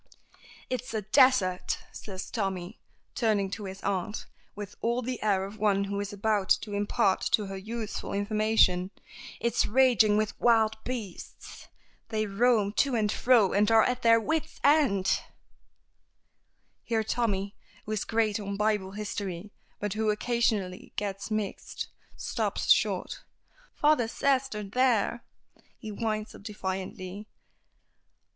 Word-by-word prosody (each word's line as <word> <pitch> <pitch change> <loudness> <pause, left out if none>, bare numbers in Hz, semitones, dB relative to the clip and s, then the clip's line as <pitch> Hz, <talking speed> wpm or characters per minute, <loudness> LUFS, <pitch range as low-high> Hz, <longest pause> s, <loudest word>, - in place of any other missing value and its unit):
"It's 250 -2 -4
a 215 - -1
desert," 215 -5 +3 0.2
says 190 -2 -7
Tommy, 190 -2 -3 0.3
turning 210 -5 +1
to 205 0 -5
his 190 0 -8
aunt, 200 +2 -2 0.3
with 205 -1 -7
all 235 +2 0
the 255 0 -4
air 195 -3 +1
of 200 +2 -10
one 200 -2 +2
who 200 0 -3
is 205 0 -4
about 205 -1 0
to 210 - -7
impart 200 -2 +1
to 210 - +3
her 195 0 -6
useful 215 +2 -5
information. 205 -3 +2 0.5
"It's 235 - +1
raging 225 -4 +4
with 215 -1 -2
wild 225 -2 +4
beasts. 225 -8 -7 0.4
They 215 -1 0
roam 210 0 +2
to 275 -3 +3
and 210 -2 +1
fro 235 -4 +4
and 205 +2 +3
are 225 -1 +6
at 250 0 0
their 230 0 +6
wits' 315 +6 -2
ends 265 -11 +3 0.9
" - - -47 0.7
here 225 -1 0
Tommy, 205 -3 -1 0.3
who 215 - -6
is 215 - -1
great 220 -2 0
on 200 -1 -4
Bible 210 -2 0
history, 200 -2 -5 0.3
but 210 -1 -2
who 220 0 0
occasionally 210 -4 -1
gets 200 0 -4
mixed, 215 -2 -4 0.3
stops - - -1
short. - - +2 0.5
"Father 295 -6 +3
says 270 +2 +1
they're 210 -4 -5
there," 235 +1 +1 0.5
he 220 -3 -7
winds 215 0 -3
up - - -12
defiantly. 190 -1 -5
215 Hz, 135 wpm, -28 LUFS, 200-230 Hz, 0.9 s, are